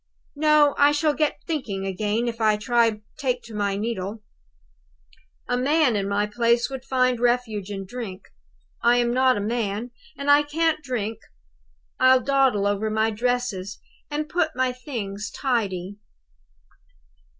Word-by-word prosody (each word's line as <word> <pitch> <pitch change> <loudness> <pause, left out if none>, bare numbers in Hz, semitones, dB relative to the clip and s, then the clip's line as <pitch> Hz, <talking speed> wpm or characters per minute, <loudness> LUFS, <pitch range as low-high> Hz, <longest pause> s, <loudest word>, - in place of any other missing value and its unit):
No; 300 -1 +4
I 285 +1 +6
shall 300 0 +2
get 305 0 -1
thinking 225 - -3
again 210 +5 -1
if 230 -1 -4
I 215 -1 +3 0.6
take 250 -4 -1
to 230 -1 -12
my 205 -1 -1
needle. 210 -1 -4 1.2
A 245 - 0
man, 275 0 +2
in 200 -1 -1
my 205 +1 +1
place, 235 +3 +1
would 265 -1 -6
find 255 -2 +1
refuge 240 -5 0
in 195 -1 -5
drink. 205 -3 -8 0.5
I'm 240 0 +3
not 255 -1 +3
a - - -2
man, 220 +1 -2 0.3
and 280 +1 +1
I 290 +1 +7
can't 310 +1 0
drink. 225 -5 -3 0.8
I'll 255 0 +6
dawdle 265 -6 +2
over 205 +2 0
my 220 +1 +1
dresses, 220 -4 -2 0.3
and 300 +1 -3
put 320 -2 0
my 255 0 +1
things 225 -5 -5
tidy." 205 -7 -2
240 Hz, 140 wpm, -24 LUFS, 210-265 Hz, 1.2 s, I